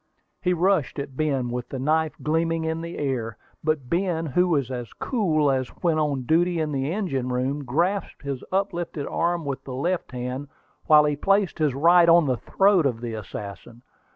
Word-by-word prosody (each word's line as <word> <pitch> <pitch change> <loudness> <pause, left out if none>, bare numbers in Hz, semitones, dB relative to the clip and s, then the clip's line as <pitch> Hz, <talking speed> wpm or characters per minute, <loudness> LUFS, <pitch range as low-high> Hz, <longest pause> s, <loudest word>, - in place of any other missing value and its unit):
He 180 - +1
rushed 180 -5 +1
at 140 -2 -5
Ben, 135 -5 0
with 125 0 -4
the 135 - -5
knife 155 +4 +1
gleaming 165 +1 0
in 160 0 -2
the 170 +1 -6
air; 120 -6 -2 0.3
but 155 -4 0
Ben, 170 +1 0
who 180 +5 +2
was 140 -7 0
as 120 -3 -5
cool 155 - +1
as 130 -1 0 0.2
when 165 -3 +2
on 145 -4 0
duty 170 +5 +2
in 155 -1 -1
the 135 +1 -1
engine 160 -11 -2
room, 130 +3 -1
grasped 170 +11 -1
his 140 -2 -4
uplifted 175 -6 -2
arm 170 -1 -1
with 140 -2 -4
the 130 - -7
left 170 +4 -2
hand, 125 +3 -4 0.4
while 150 -1 +7
he 150 -1 +1
placed 195 +4 +1
his 150 -4 +1
right 170 +4 +5
on 170 -1 +6
the 130 -3 0
throat 190 - +3
of 120 -4 -3
the 120 -2 -4
assassin. 105 +2 -8
150 Hz, 185 wpm, -24 LUFS, 130-170 Hz, 0.4 s, while